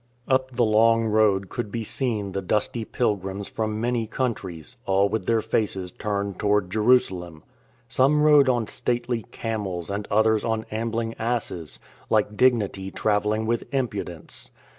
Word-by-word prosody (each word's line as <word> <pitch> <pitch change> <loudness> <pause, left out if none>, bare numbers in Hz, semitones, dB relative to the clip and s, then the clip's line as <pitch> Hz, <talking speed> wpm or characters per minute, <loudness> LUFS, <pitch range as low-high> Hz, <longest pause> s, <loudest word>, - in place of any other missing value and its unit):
Up 130 -1 +1
the 120 - +3
long 115 +1 +4
road 105 -3 +3
could 110 +1 -5
be 115 0 -3
seen 110 -4 -1
the 95 +1 -3
dusty 105 +4 -1
pilgrims 100 -4 -2
from 110 -1 -3
many 120 -1 0
countries, 105 - -4
all 95 +1 +3
with 100 -2 -3
their 115 -1 +3
faces 95 -5 -1
turned 100 -1 -3
toward 105 -3 +1
Jerusalem. 95 -8 +2 0.4
Some 150 +3 +3
rode 145 -3 +6
on 120 -3 +1
stately 120 +1 -2
camels 100 -6 -4
and 100 +1 -3
others 110 +1 +3
on 110 -1 -1
ambling 115 +1 -2
asses, 110 - -2 0.3
like 105 -1 +2
dignity 105 -6 +2
travelling 105 +2 0
with 115 +5 -2
impudence. 105 - -3
110 Hz, 140 wpm, -25 LUFS, 100-115 Hz, 0.4 s, rode